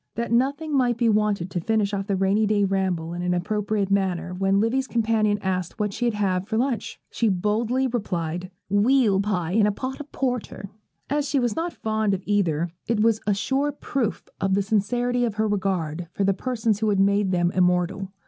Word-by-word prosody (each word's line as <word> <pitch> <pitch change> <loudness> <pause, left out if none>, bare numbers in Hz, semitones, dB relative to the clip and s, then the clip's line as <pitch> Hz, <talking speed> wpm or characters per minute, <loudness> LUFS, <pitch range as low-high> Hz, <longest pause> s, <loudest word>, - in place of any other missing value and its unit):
That 235 0 -3
nothing 280 +5 +1
might 245 -3 +2
be 235 -1 +2
wanting 210 -4 +1
to 180 - -2
finish 210 +2 0
off 195 0 -2
the 200 - +1
rainy 195 +3 +2
day 205 -1 +2
ramble 185 -4 -1
in 175 - -4
an 180 0 0
appropriate 205 +1 -1
manner, 185 -3 0
when 195 +2 +1
Livy's 255 +5 +1
companion 220 -3 +1
asked 185 -2 -2
what 210 -1 -1
she'd 240 -1 -1
have 190 -2 0
for 220 0 -1
lunch, 245 -1 -1
she 230 - +1
boldly 220 +7 0
replied, 180 -7 -2 0.2
'Weal 205 0 +3
pie 180 -5 -1
and 210 +1 +4
a - - +2
pot 260 +7 -5
of 295 -1 -9
porter.' 245 -6 -3 0.4
As 290 0 -1
she 280 -1 +2
was 240 -3 0
not 335 +2 -2
fond 215 -5 0
of 185 - -8
either, 175 -5 +1 0.2
it 230 -2 +1
was 225 0 +3
a 205 - +3
sure 270 +7 0
proof 260 -5 -3
of 195 0 +1
the 200 - +1
sincerity 245 +4 0
of 225 -4 -1
her 215 +1 +1
regard 180 -5 -1
for 200 - -1
the 195 0 +3
persons 225 -1 -1
who 220 -1 +1
have 200 - +2
made 200 0 +3
them 175 -1 +1
immortal. 180 +1 +1
205 Hz, 200 wpm, -24 LUFS, 190-235 Hz, 0.4 s, and